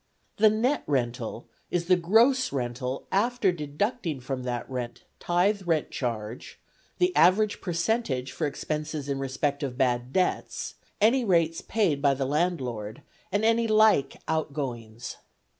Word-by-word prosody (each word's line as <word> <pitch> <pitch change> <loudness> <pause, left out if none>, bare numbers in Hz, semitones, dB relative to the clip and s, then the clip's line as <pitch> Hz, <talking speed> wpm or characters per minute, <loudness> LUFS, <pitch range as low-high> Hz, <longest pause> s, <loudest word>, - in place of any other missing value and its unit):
The 215 +1 +6
net 240 +7 +1
rental 120 -4 -2 0.2
is 175 -1 -1
the 185 +1 +5
gross 235 +9 +3
rental 125 0 -3
after 220 0 +2
deducting 165 - -2
from 130 +1 -4
that 120 -1 -3
rent 120 -2 -5 0.2
tithe 190 +4 +1
rent 160 -3 +1
charge, 115 -2 -4 0.4
the 360 0 +2
average 205 +4 +4
percentage 170 - -1
for 150 +3 -1
expenses 150 0 -4
in 140 -1 -2
respect 140 +2 -1
of 130 -4 -3
bad 125 -1 +1
debts, 185 +3 -1 0.3
any 235 +5 +4
rates 165 -5 +2
paid 185 -11 0
by 140 -1 +3
the 135 0 -1
landlord, 130 -7 -2 0.3
and 205 +3 +1
any 230 0 +3
like 215 -10 +4
outgoings. 130 -8 -3
155 Hz, 135 wpm, -27 LUFS, 130-205 Hz, 0.4 s, The